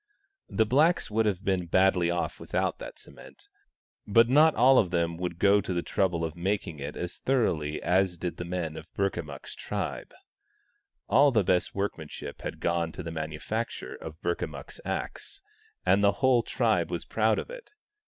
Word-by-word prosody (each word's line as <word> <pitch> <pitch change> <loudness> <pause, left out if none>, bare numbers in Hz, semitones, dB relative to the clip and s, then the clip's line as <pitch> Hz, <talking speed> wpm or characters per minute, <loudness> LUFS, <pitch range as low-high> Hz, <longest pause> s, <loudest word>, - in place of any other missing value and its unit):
The 110 - +2
blacks 150 +5 +2
would 110 +1 +2
have 100 -1 -2
been 95 -3 0
badly 90 0 +3
off 85 0 -2
without - - -1
that - - -8
cement, - - -15 0.6
but 115 +3 +5
not 150 +5 +5
all 130 +2 +6
of 95 - +2
them 85 -1 0
would 90 -1 -4
go 100 +2 +4
to 95 - -3
the 85 - -1
trouble 85 -4 0
of 80 - -5
making 85 -3 -2
it 70 +2 -5
as 90 0 -5
thoroughly 80 - 0
as 90 -1 +2
did 90 +1 -4
the - - -4
men 85 -3 -4
of 80 +1 -10
Burkamukk's 85 -7 -3
tribe. - - -4 1.0
All 140 +7 +5
the 110 -6 +2
best 90 0 +1
workmanship 100 -6 -5
had - - -6
gone 85 -1 0
to 90 - -7
the 85 - -5
manufacture 80 +8 -4
of 80 0 -9
Burkamukk's 75 -5 -4
axe, - - -5 0.4
and 95 +2 +4
the 100 0 +5
whole 130 -3 +3
tribe - - +1
was - - -4
proud - - +1
of - - -5
it. - - -10
90 Hz, 175 wpm, -28 LUFS, 85-110 Hz, 1.0 s, all